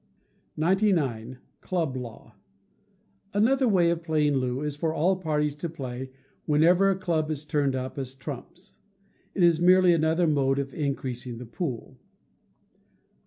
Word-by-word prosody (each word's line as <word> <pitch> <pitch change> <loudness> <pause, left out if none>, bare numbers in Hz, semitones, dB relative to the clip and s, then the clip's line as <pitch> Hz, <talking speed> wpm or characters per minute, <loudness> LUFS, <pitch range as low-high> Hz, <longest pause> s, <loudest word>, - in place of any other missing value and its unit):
99. 155 - +1 0.2
Club 165 -7 -2
Law. 115 -3 -8 1.0
Another 255 +5 +3
way 175 -6 +3
of 170 -1 -2
playing 155 -3 +1
Loo 130 0 -1
is 150 -1 -3
for 160 +2 -1
all 165 +4 +2
the 185 - -11
parties 150 -3 0
to 170 +3 -4
play 130 -4 -6 0.4
whenever 170 +6 +4
a 195 - +2
club 165 -4 -1
is 150 -1 -4
turned 145 -3 0
up 130 +2 -4
as 130 -1 -5
trumps. 145 +6 -9 0.6
It 185 - +2
is 170 -1 +4
merely 180 0 +6
another 165 +2 +2
mode 140 -3 +2
of 135 -1 -3
increasing 130 -5 -3
the 125 - -8
pool. 125 0 -5
150 Hz, 145 wpm, -26 LUFS, 135-175 Hz, 1.0 s, merely